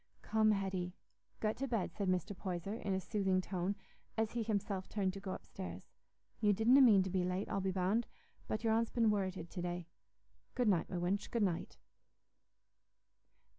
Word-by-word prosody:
"Come, 220 -1 +3
Hetty, 190 -3 0 0.5
get 215 0 0
to 275 - -2
bed," 230 -7 -1
said 200 - -2
Mr. 185 +2 0
Poyser, 185 +1 -3
in 200 -4 -2
a - - +1
soothing 190 -2 +1
tone, 185 +1 -1 0.4
as 220 -1 +1
he 240 - -1
himself 200 -3 -1
turned 195 -3 0
to 195 - -6
go 195 -1 -5
upstairs. 185 0 -7 0.5
"You 210 -1 +4
didna 235 +7 +6
mean 210 -7 +7
to 190 - -4
be 185 -1 +1
late, 180 +2 -1
I'll 195 - 0
be 190 - 0
bound, 190 +5 +1 0.4
but 215 +1 -2
your 225 -1 +3
aunt's 230 +1 +2
been 230 -3 +3
worrited 185 -4 -2
to 180 - -4
day. 175 0 -3 0.7
Good 245 -4 +3
night, 180 -5 +2
my 180 - -3
wench, 180 +4 0
good 230 -3 +1
night." 180 -4 -1
195 Hz, 180 wpm, -36 LUFS, 185-220 Hz, 0.7 s, mean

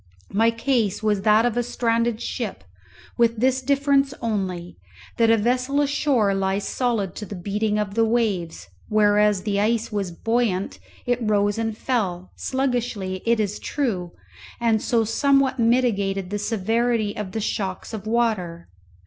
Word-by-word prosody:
My 225 +3 +4
case 230 -3 0
was 210 -2 +1
that 215 +2 +4
of 240 -2 0
a 245 - +2
stranded 230 -1 0
ship, 210 - -4 0.6
with 230 -1 +3
this 260 +2 +2
difference 280 0 +2
only, 190 - -3 0.4
that 230 -1 +4
a 225 - +5
vessel 250 +5 +1
ashore 280 -7 +2
lies 195 +1 -1
solid 230 -7 -1
to 210 - -5
the 200 - -7
beating 210 +3 -1
of 210 -2 -2
the 225 +2 +2
waves, 215 -8 -1 0.2
whereas 210 -2 +3
the 200 -1 0
ice 225 +2 0
was 200 -3 -2
buoyant, 220 0 -1 0.3
it 245 0 +1
rose 205 -1 +1
and 225 -1 -2
fell, 185 -9 -2
sluggishly 240 -8 -2
it 235 -1 +3
is 210 -1 -1
true, 190 - -2 0.5
and 225 -2 +2
so 235 -2 +1
somewhat 275 +4 +2
mitigated 200 -6 +1
the 205 - -2
severity 225 +1 0
of 200 -3 -5
the 225 - -2
shocks 195 -1 -3
of 215 -1 -6
water. 215 -8 -1
220 Hz, 150 wpm, -23 LUFS, 200-240 Hz, 0.6 s, a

